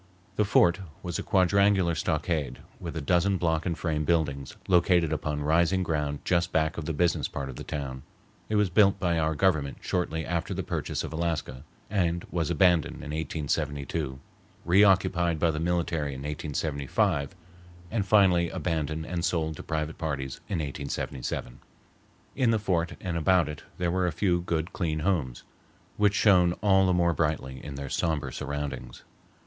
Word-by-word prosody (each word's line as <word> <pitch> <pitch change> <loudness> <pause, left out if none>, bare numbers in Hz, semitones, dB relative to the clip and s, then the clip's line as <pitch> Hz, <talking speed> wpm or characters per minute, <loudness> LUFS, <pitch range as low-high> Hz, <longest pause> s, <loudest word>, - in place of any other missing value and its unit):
The 105 - +2
fort 90 -2 +4 0.2
was 85 -2 -3
a - - -1
quadrangular 95 -1 +3
stockade 75 -5 -1 0.2
with 80 - -6
a - - -2
dozen 90 +6 +2
block 80 -1 0
and 85 -2 -1
frame 75 -3 -1
buildings 70 -4 0
located 85 -3 +3
upon 75 -1 -2
rising 85 +4 +2
ground 75 -4 -2
just 85 -1 +1
back 80 -1 +1
of 80 - -6
the 80 - -1
business 85 +3 +1
part 70 -1 -5
of 65 - -7
the - - -7
town. 70 -4 -5 0.5
It 110 - 0
was 105 -3 +2
built 100 +1 +4
by 85 -3 +1
our 80 0 +1
Government 75 -5 +1
shortly 80 -3 -2
after 85 -1 -2
the - - -2
purchase - - -3
of - - -6
Alaska, 80 -6 -2 0.2
and 85 -4 0
was 85 -3 -1
abandoned 85 -1 +3
in 75 - -7
1872, 75 -2 -2 0.5
reoccupied 90 -2 +4
by 80 +1 +2
the 75 - -3
military 85 -4 -1
in 65 - -7
1875, 70 0 -1 0.6
and 110 -2 0
finally 95 -4 +4
abandoned 80 -3 -2
and 85 -1 -3
sold 80 -3 0
to - - -6
private 80 0 -3
parties 70 -5 -3
in 95 - -1
1877. 70 -4 -4 0.8
In 130 -4 +2
the 115 - +3
fort 90 -5 0
and 85 -2 -2
about 85 0 +3
it 75 -1 -6 0.2
there 85 -1 0
were 90 0 +1
a - - 0
few 85 +1 +1
good, 85 -1 -2
clean 80 -4 -1
homes, 75 -9 -1 0.5
which 105 -1 +3
shone 90 -5 +5
all 95 0 +3
the - - +3
more 85 -1 +3
brightly 70 -5 -2
in 70 - -7
their 70 0 -5
sombre 75 -5 -1
surroundings. 70 0 -5
85 Hz, 165 wpm, -27 LUFS, 75-90 Hz, 0.8 s, shone